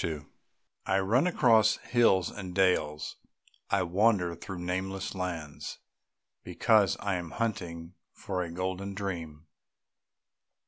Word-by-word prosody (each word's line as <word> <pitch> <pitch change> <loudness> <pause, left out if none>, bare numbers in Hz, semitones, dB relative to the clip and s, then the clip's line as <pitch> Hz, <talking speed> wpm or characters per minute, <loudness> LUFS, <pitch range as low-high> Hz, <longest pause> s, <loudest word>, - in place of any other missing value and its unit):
II 75 -3 -3 0.6
I 95 - +3
run 110 - +3
across 115 - +4
hills 115 -6 +3
and 95 -3 -7
dales, 85 -6 +1 0.5
I 100 -2 +2
wander 90 0 +2
through 90 +3 -7
nameless 95 +2 -3
lands... 85 -6 -5 0.7
because 105 -4 +3
I 100 -2 0
am 85 -2 -5
hunting 90 -7 -3 0.2
for 95 -2 -4
a 85 - -3
golden 95 +3 -3
dream. 85 -6 -5
95 Hz, 110 wpm, -29 LUFS, 85-100 Hz, 0.7 s, across